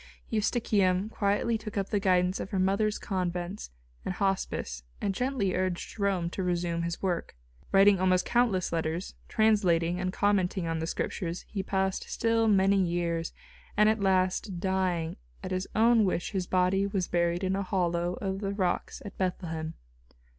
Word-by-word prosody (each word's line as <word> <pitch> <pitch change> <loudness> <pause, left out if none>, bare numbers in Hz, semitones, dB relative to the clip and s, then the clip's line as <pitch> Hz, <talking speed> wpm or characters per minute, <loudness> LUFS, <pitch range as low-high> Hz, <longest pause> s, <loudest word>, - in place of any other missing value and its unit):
Eustochium 210 -3 +1
quietly 215 +3 0
took 215 -1 -7
up 195 -1 -1
the 205 - +1
guidance 185 -1 +2
of - - -5
her 195 - -2
mother's 200 +3 +1
convents 180 - -3 0.3
and 185 - -3
hospice 190 - -1 0.2
and 200 - -1
gently 245 -5 0
urged 185 -1 -2
Jerome 195 -5 0
to 190 - -4
resume 175 -2 -1
his 170 +2 -4
work. 175 - -2 0.4
Writing 195 0 +6
almost 185 -1 +3
countless 225 -8 +1
letters, 165 +2 -2 0.2
translating 180 -6 +2
and 185 0 -1
commenting 190 -3 +1
on 165 -1 -1
the 160 - -2
Scriptures 170 0 -3
he 200 - -3
passed 190 0 -1
still 225 0 +1
many 195 -1 +4
years, 170 -2 -1 0.5
and 210 0 +6
at 220 0 +1
last, 185 0 +1
dying, 180 -3 -1 0.3
at - - -5
his 185 +1 -2
own 230 0 +5
wish 180 -3 -1
his 190 -3 -2
body 185 +2 +2
was 195 -3 -1
buried 170 +1 0
in 190 0 +1
a 195 - -1
hollow 175 -2 0
of 195 0 -3
the 200 -1 -3
rocks 185 -3 -1
at 200 - -8
Bethlehem. 165 -4 -3
185 Hz, 160 wpm, -29 LUFS, 175-200 Hz, 0.5 s, Writing